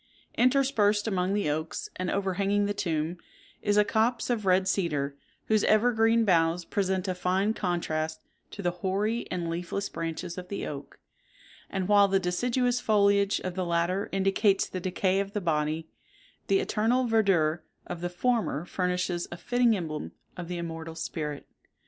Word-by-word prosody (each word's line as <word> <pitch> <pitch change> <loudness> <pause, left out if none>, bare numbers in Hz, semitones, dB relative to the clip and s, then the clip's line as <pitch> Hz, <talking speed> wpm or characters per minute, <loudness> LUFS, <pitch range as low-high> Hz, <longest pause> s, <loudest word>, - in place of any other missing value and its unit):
Interspersed 240 -5 +3
among 190 -1 0
the 205 -6 0
oaks, 155 +2 -2
and 185 -1 -3
overhanging 200 +1 +1
the 205 - -1
tomb, 170 -3 -2 0.4
is 205 0 +1
a 210 - +5
copse 230 +3 +1
of 215 -5 -1
red 185 +1 +4
cedar, 150 -8 0 0.3
whose 215 -1 +2
evergreen 225 0 +4
boughs 170 -2 +2
present 190 -2 -1
a 185 - 0
fine 185 +4 +1
contrast 160 -5 -2 0.3
to 200 - -8
the 175 - +1
hoary 195 +6 -1
and 175 -2 -2
leafless 175 +4 -3
branches 165 +2 -4
of 180 - -9
the 200 - -4
oak; 145 -1 -8 0.7
and 190 -2 -2
while 205 -1 +6
the 195 0 +2
deciduous 245 +7 0
foliage 200 -2 +3
of 185 - -4
the 185 +1 -2
latter 170 +3 0
indicates 195 +1 +2
the 185 - -5
decay 185 +1 0
of 200 0 -3
the 210 - 0
body, 160 -2 -1 0.6
the 390 - +3
eternal 245 - +1
verdure 190 -9 +2 0.2
of 175 -1 -6
the 175 - -2
former 180 - 0
furnishes 180 -1 -1
a 175 - -6
fitting 245 +2 +2
emblem 155 -4 -5 0.2
of 175 -2 -6
the 180 0 -4
immortal 165 -1 -6
spirit. 150 -3 -4
190 Hz, 160 wpm, -28 LUFS, 170-210 Hz, 0.7 s, while